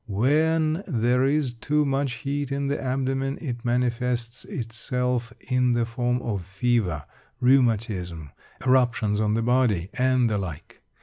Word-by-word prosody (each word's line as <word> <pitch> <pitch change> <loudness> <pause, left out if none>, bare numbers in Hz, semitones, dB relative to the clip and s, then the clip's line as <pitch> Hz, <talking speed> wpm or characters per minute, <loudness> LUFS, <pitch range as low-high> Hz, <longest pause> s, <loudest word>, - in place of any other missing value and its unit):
When 155 - +2
there 125 +1 +2
is 140 -2 +1
too 150 +6 0
much 135 -1 0
heat 140 +1 -3
in 140 0 -1
the 140 - -1
abdomen, 135 +1 -1
it 120 -6 -5
manifests 120 -1 -1
itself 120 +1 -2 0.2
in 125 -1 +2
the 120 -1 +1
form 120 +1 -1
of 100 -5 -2
fever, 95 - 0 0.3
rheumatism, 110 - +1 0.3
eruptions 120 -5 +2
on 105 0 +1
the 115 - 0
body, 115 -7 +2
and 130 -1 +2
the 105 -2 0
like. 85 -6 -7
125 Hz, 135 wpm, -25 LUFS, 115-135 Hz, 0.3 s, When